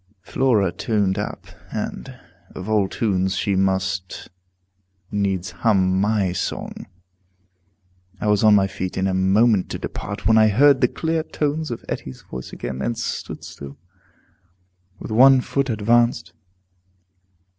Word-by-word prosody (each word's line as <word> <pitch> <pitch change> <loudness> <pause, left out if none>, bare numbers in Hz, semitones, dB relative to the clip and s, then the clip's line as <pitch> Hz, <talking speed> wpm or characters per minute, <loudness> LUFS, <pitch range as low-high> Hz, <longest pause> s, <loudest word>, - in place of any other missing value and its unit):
Flora 110 -6 +1
tuned 100 0 -1
up, - - -5 0.3
and, - - -5 0.4
of 95 - -7
all 105 -3 +2
tunes, 95 -5 0
she 100 +1 0
must 95 -1 -1 0.8
needs 95 -3 -1
hum 95 0 +2
my 100 -3 +1
song. - - -5 1.3
I - - -4
was 105 0 +2
on 105 -1 +7
my 100 -1 +4
feet 95 -1 -5
in 95 - 0
a 95 - 0
moment 95 +2 +3
to - - -4
depart, - - -6
when 110 0 +5
I 110 - +6
heard 135 +6 +4
the 125 - +5
clear 160 +5 -2
tones 155 0 -2
of 120 - -6
Etty's 65 -1 -6
voice 65 -1 -8
again, 65 0 -6
and 115 +9 -2
stood 115 - -5
still, 70 0 -10 1.2
with - - -8
one 130 +4 +7
foot 135 +1 -1
advanced. 115 -5 +1
100 Hz, 135 wpm, -22 LUFS, 95-115 Hz, 1.3 s, on